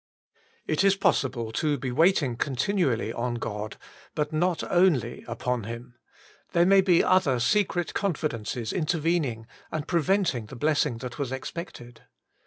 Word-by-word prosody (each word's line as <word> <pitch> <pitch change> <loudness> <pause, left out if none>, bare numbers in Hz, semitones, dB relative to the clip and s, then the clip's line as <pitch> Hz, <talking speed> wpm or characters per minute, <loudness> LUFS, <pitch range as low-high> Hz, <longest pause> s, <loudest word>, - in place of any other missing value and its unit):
IT 155 +4 +1
is 195 0 +5
possible 125 - 0
to 145 +5 0
be 125 0 -4
waiting 155 -3 +3
continually 130 - 0
on 120 0 -2
God, 105 -2 -5 0.4
but 150 0 -1
not 175 +2 +1
only 165 -10 +2
upon 120 -1 -2
Him; 120 +2 -7 0.6
there 170 0 +4
may 195 +1 +6
be 180 -3 +4
other 175 -9 +3
secret 175 - +1
confidences 125 - -2
intervening, 155 -8 0 0.3
and 155 -1 -3
pre 170 -2 +2
venting 180 - +1
the 130 - -10
blessing 145 -3 +1
that 125 +1 -7
was 135 -3 -2
expected. 130 -3 -7
145 Hz, 140 wpm, -26 LUFS, 120-175 Hz, 0.6 s, may